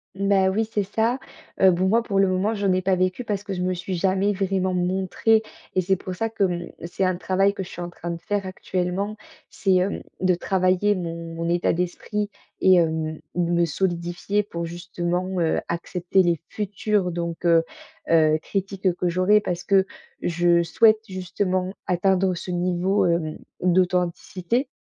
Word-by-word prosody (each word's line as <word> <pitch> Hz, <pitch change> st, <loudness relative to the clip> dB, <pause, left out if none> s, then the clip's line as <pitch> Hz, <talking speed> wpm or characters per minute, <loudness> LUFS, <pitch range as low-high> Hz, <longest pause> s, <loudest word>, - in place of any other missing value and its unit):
Ben 195 Hz, -1 st, +3 dB
oui 220 Hz, +4 st, +1 dB
c'est 205 Hz, -, +1 dB
ça! 225 Hz, +6 st, 0 dB, 0.4 s
Heu, 190 Hz, -1 st, +7 dB
bon, 185 Hz, +2 st, +1 dB
moi 230 Hz, +3 st, +4 dB
pour 200 Hz, -4 st, -1 dB
le 195 Hz, -, +5 dB
moment, 185 Hz, +4 st, +1 dB
j'en 200 Hz, -3 st, +1 dB
ai 185 Hz, -, +2 dB
pas 190 Hz, 0 st, +2 dB
vécu 185 Hz, +6 st, -1 dB
parce 205 Hz, -2 st, -2 dB
que 205 Hz, -, -7 dB
je 180 Hz, -, -3 dB
me 185 Hz, 0 st, 0 dB
suis 180 Hz, +1 st, -4 dB
jamais 190 Hz, +3 st, +1 dB
vraiment 190 Hz, -1 st, 0 dB
montrée 190 Hz, +5 st, +1 dB, 0.3 s
et 185 Hz, -, +3 dB
c'est 190 Hz, +1 st, +1 dB
pour 185 Hz, 0 st, -6 dB
ça 225 Hz, +5 st, -1 dB
que, 220 Hz, -3 st, +1 dB
mmh, 175 Hz, -1 st, -3 dB, 0.2 s
c'est 175 Hz, +3 st, -2 dB
un 185 Hz, -1 st, +1 dB
travail 195 Hz, +2 st, +2 dB
que 195 Hz, -, -4 dB
je 185 Hz, -, -10 dB
suis 175 Hz, -, -8 dB
en 175 Hz, -, -4 dB
train 175 Hz, 0 st, -6 dB
de 170 Hz, 0 st, -6 dB
faire 205 Hz, +1 st, -2 dB
actuellement, 185 Hz, +2 st, -3 dB, 0.3 s
c'est, 195 Hz, -2 st, 0 dB
hem, 185 Hz, +2 st, +1 dB, 0.2 s
de 185 Hz, -1 st, +3 dB
travailler 185 Hz, +3 st, +2 dB
mon 170 Hz, -2 st, -5 dB
mon 165 Hz, +1 st, -2 dB
état 175 Hz, 0 st, +2 dB
d'esprit 190 Hz, +4 st, -2 dB, 0.3 s
et 185 Hz, 0 st, +6 dB
hem, 160 Hz, -2 st, +1 dB, 0.2 s
de 175 Hz, -1 st, 0 dB
me 170 Hz, 0 st, +3 dB
solidifier 175 Hz, +4 st, -1 dB
pour 170 Hz, -4 st, -5 dB
justement, 175 Hz, +1 st, -3 dB
heu, 160 Hz, -, +2 dB
accepter 180 Hz, +2 st, 0 dB
les 170 Hz, -2 st, +1 dB
futures 205 Hz, -2 st, -1 dB
donc 170 Hz, 0 st, -4 dB
heu 165 Hz, -1 st, +5 dB, 0.5 s
heu, 155 Hz, -1 st, +5 dB
critiques 195 Hz, -1 st, -1 dB
que 180 Hz, 0 st, 0 dB
j'aurai, 185 Hz, +4 st, +4 dB
parce 180 Hz, -3 st, -3 dB
que 195 Hz, -1 st, +4 dB, 0.4 s
je 175 Hz, 0 st, +3 dB
souhaite, 215 Hz, +6 st, +4 dB
justement, 185 Hz, 0 st, -2 dB
atteindre 185 Hz, 0 st, +2 dB
ce 180 Hz, -, -6 dB
niveau, 180 Hz, +3 st, +1 dB
hem, 170 Hz, -3 st, 0 dB, 0.2 s
d'authenticité. 180 Hz, -, 0 dB
185 Hz, 180 wpm, -24 LUFS, 175-195 Hz, 0.5 s, Heu